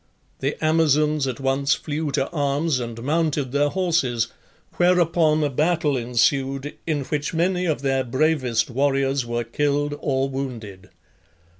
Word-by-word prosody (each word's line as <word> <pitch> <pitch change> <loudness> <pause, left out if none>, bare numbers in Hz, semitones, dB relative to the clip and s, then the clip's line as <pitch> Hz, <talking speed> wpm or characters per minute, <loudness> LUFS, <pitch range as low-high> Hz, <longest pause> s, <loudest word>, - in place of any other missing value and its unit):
The 140 +2 -1
Amazons 155 -2 +2
at 130 -1 -4
once 135 +1 +1
flew 150 0 -3
to 135 -2 +1
arms 145 -1 0
and 115 -1 -6
mounted 150 -2 0
their 145 +1 +2
horses, 160 -10 0 0.5
whereupon 170 -3 +3
a 145 - +1
battle 155 +1 +1
ensued, 135 +3 0
in 150 -3 0
which 150 +4 -3
many 180 +2 +1
of 150 -3 -1
their 135 -1 +1
bravest 130 -2 0
warriors 135 0 +1
were 120 0 -1
killed 145 +4 -1
or 135 -1 0
wounded. 120 -8 -6
140 Hz, 135 wpm, -23 LUFS, 130-155 Hz, 0.5 s, whereupon